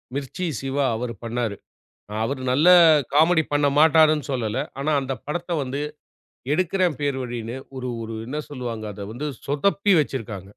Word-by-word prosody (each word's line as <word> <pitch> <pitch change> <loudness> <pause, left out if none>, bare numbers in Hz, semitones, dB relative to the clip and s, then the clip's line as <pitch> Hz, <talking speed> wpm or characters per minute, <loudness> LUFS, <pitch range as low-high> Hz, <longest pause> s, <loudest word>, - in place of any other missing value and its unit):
மிர்ச்சி 145 +6 -4 0.2
சிவா 135 +1 0
அவரு 120 +1 -4
பண்ணாரு. 115 -2 -2 0.7
அவரு 130 +2 -2
நல்லா 160 +7 +6 0.4
காமெடி 160 +2 +5
பண்ண 145 0 +3
மாட்டாருன்னு 155 -1 +5
சொல்லல. 120 -2 -2 0.2
ஆனா 150 +3 0
அந்தப் 130 -3 -5
படத்த 175 +4 -4
வந்து 135 +2 -4 0.7
எடுக்குறேன் 180 -1 +1
பேர் 140 -2 0
வழினு 120 0 -5 0.2
ஒரு 125 -1 -4
ஒரு 115 0 -6
என்ன 145 +4 -4
சொல்லுவாங்க. 120 -5 -5
அத 100 0 -7
வந்து 150 +5 -4 0.2
சொதப்பி 195 +7 +2
வச்சிருக்காங்க. 115 -9 -4
140 Hz, 140 wpm, -23 LUFS, 120-155 Hz, 0.7 s, நல்லா